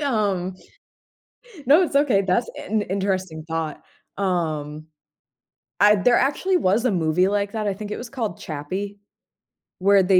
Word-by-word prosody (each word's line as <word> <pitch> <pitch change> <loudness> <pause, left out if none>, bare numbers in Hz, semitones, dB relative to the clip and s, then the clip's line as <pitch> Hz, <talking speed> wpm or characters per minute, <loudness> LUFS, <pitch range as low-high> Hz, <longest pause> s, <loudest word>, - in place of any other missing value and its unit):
um, 195 -7 0 1.1
no, 300 +8 +6
it's 285 -5 -1
okay, 260 -9 +3
that's 195 +5 +1 0.2
in 215 0 +1
interesting 185 -5 -2
thought, 160 -2 -3 0.4
um, 155 -5 -2 0.9
I 210 +1 +7
there 240 +5 +3
actually 360 +7 +2
was 215 - +1
a 250 - +3
movie 175 0 +2
like 200 0 0
that, 215 -2 -2
I 200 - +1
think 210 +1 -7
it - - -3
was 235 -1 -7
called 230 -9 -4
Chappie, 185 +7 -5 0.8
where 195 0 +5
they 185 0 +5
200 Hz, 145 wpm, -23 LUFS, 180-220 Hz, 1.1 s, I